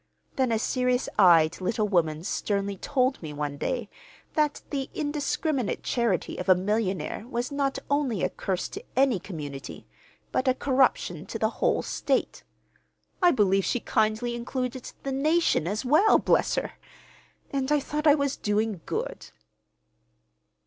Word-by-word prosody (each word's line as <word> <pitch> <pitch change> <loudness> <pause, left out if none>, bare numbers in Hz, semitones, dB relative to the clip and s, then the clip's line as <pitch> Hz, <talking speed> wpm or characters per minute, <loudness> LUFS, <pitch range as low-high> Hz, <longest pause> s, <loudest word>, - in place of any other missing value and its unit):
Then 260 -3 +1
a 225 - +2
serious 250 +2 0
eyed 170 -3 +5
little 215 +3 0
woman 165 -5 +1
sternly 200 0 -1
told 260 +5 0
me 155 -3 -6
one 145 -1 -3
day 245 - -2 0.5
that 300 -1 0
the 275 -2 -2
indiscriminate 290 -3 -1
charity 235 -8 0
of 180 - -4
a 185 - +8
millionaire 195 0 -2
was 245 +2 -3
not 280 -1 0
only 275 -9 0
a - - +1
curse 190 -2 -2
to 410 - -8
any 260 -6 +3
community, 145 -8 -7 0.5
but 260 - 0
a 255 - +4
corruption 265 -1 +1
to - - -4
the - - +1
whole - - +2
state. - - -1 0.8
I 355 - +7
believe 195 - +3
she 245 - 0
kindly 220 +2 0
included 250 +1 -4
the 275 - -2
nation, 300 - +2
as 210 +7 -2
well, 310 +11 +5
bless - - +2
her! - - -2 0.8
And 275 0 -1
I 295 - +4
thought 300 +2 -2
I 295 - +8
was 280 -2 -1
doing 210 -3 -1
good!" - - -4
240 Hz, 150 wpm, -27 LUFS, 195-275 Hz, 0.8 s, a